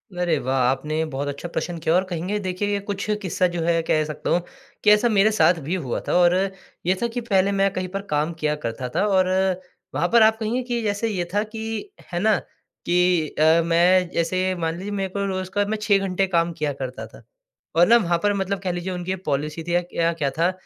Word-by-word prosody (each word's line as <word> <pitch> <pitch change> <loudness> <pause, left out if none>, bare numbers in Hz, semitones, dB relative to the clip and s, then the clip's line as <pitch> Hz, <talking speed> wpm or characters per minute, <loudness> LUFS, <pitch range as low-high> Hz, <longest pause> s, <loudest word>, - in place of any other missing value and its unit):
अरे 175 -3 +1
वाह! 130 +1 -1
आपने 135 +5 0
ये 160 - +1
बहुत 140 +2 -2
अच्छा 145 +4 -5
प्रश्न 170 0 -4
किया, 160 0 0
और 185 - +3
कहेंगे, 180 +4 -2
देखिए 190 +1 -2
ये 200 - 0
कुछ 200 0 -4 0.2
किस्सा 185 -1 +1
जो 170 - -1
है, 165 0 +2
कह 155 -1 +2
सकता 150 -1 -5
हूँ 175 - +3 0.4
कि 210 - +5
ऐसा 210 +3 +4
मेरे 215 0 +4
साथ 180 - +6
भी 165 +7 -2
हुआ 140 -10 -3
था। - - 0
और 175 0 +5 0.5
ये 185 - +3
था 235 - +2
कि 245 - -1
पहले 200 -4 +2
मैं 195 0 +2
कहीं 185 0 -3
पर 195 - -1
काम 150 +3 +1
किया 150 -1 0
करता 115 +2 -3
था, 195 +11 0
और 190 -2 +3 0.7
वहाँ 155 +6 +1
पर 235 - +7
आप 220 0 +4
कहेंगे 230 +3 -1
कि 240 -1 -2
जैसे 205 +1 -1
ये 190 -5 -2
था 205 +1 +2
कि, 225 - -6 0.2
है 175 - -1
ना, 215 +2 +3
कि 175 -2 -1
अ, 160 +2 +5
मैं 175 +2 +4
जैसे 185 +2 0
मान 165 -1 -2
लीजिए 195 +3 -6
मेरे 195 -1 -2
को 200 0 -1
रोज़ 185 -1 -3
का 205 +1 +1
मैं 220 - 0
6 205 -2 +4
घंटे 190 +1 0
काम 170 -2 +1
किया 150 -1 0
करता 130 -2 -6
था। - - -16 0.5
और 175 +1 +6
ना 235 - +7
वहाँ 170 -6 +1
पर 205 - +3
मतलब 195 0 -2
कह 185 -1 -2
लीजिए 175 +1 -4
उनकी 180 +1 -4
ये - - 0
पॉलिसी 150 +3 -2
थी 170 +1 -3
या 175 - +3
क्या 170 -1 -1
क्या 150 -4 -1
था, 170 +2 +3
180 Hz, 240 wpm, -23 LUFS, 165-200 Hz, 0.7 s, पर